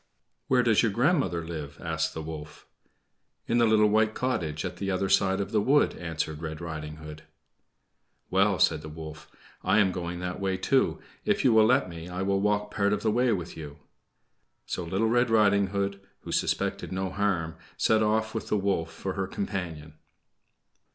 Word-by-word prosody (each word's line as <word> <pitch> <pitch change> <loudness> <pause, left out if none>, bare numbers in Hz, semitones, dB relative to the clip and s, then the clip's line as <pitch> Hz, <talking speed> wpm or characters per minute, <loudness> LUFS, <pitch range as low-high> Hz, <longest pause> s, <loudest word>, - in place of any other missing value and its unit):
"Where 125 -1 +3
does 110 -3 +4
your 115 - +2
grandmother 120 - +1
live?" 75 -4 -6
asked 80 -1 -2
the 80 - -4
wolf. 75 -1 -8 0.8
"In 120 - +1
the 120 - +5
little 110 -1 +5
white 110 +1 +2
cottage 85 -12 -2
at - - -5
the 100 - -3
other 95 0 0
side 95 -1 +3
of 100 - -3
the 105 - +2
wood," 140 +7 +3
answered 80 -2 -4
Red 80 -1 -5
Riding 75 -2 -6
Hood. 75 0 -10 1.1
"Well," 95 +1 +3
said 80 -3 +3
the 75 - -8
wolf, 80 0 -9 0.3
"I - - +3
am 100 -3 +4
going 90 -1 -4
that 90 0 -4
way, 95 -1 -1
too. 130 +8 +1 0.2
If - - +1
you 125 - +5
will 110 -1 +6
let 125 -5 +3
me, 85 0 -8
I 90 +1 -3
will 100 0 +1
walk 105 0 0
part 100 0 +1
of 105 - -2
the 110 - +2
way 125 +2 +2
with 90 -5 -3
you." 75 -2 -8 0.9
So 90 - -3
Little 95 +6 0
Red 120 +1 +2
Riding 100 -3 +4
Hood, 100 0 -2 0.2
who - - -8
suspected - - -1
no 95 0 -2
harm, 95 -5 -1 0.2
set 110 -1 +3
off 110 +1 +1
with 110 - -4
the 105 - +1
wolf 95 -4 -1
for 95 - -5
her 95 0 -2
companion. 85 -7 -5
95 Hz, 185 wpm, -27 LUFS, 80-105 Hz, 1.1 s, will